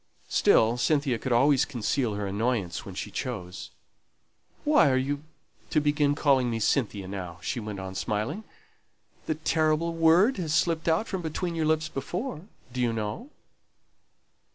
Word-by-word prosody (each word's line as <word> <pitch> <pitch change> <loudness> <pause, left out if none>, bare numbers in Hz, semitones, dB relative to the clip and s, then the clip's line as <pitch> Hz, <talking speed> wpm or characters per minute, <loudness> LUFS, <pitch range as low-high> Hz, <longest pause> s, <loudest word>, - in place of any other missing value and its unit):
Still, 115 +2 +4
Cynthia 140 -4 +1
could 130 - -4
always 135 +3 +4
conceal 120 -2 -1
her 100 0 -3
annoyance 100 -3 -2
when - - -8
she - - -5
chose. 90 -8 -5 0.9
"Why 295 - +5
are 130 - +2
you 140 +2 -1 0.5
to 155 - +3
begin 145 -1 +2
calling 135 -4 +3
me 115 -1 -2
Cynthia 105 -4 0
now?" 90 -3 -6
she 125 - -2
went 105 -3 -6
on, 95 0 -6
smiling. 105 - -2 0.8
"The 155 - 0
terrible 155 +1 +1
word 165 +9 +4
has 160 -4 -1
slipped 160 0 +1
out 165 +7 +2
from 190 -2 -3
between 170 +2 -3
your 160 -2 0
lips 155 0 +1
before, 175 - -5 0.3
do 125 - -2
you 120 -1 +2
know?" 115 - -4
140 Hz, 155 wpm, -27 LUFS, 110-160 Hz, 0.9 s, Why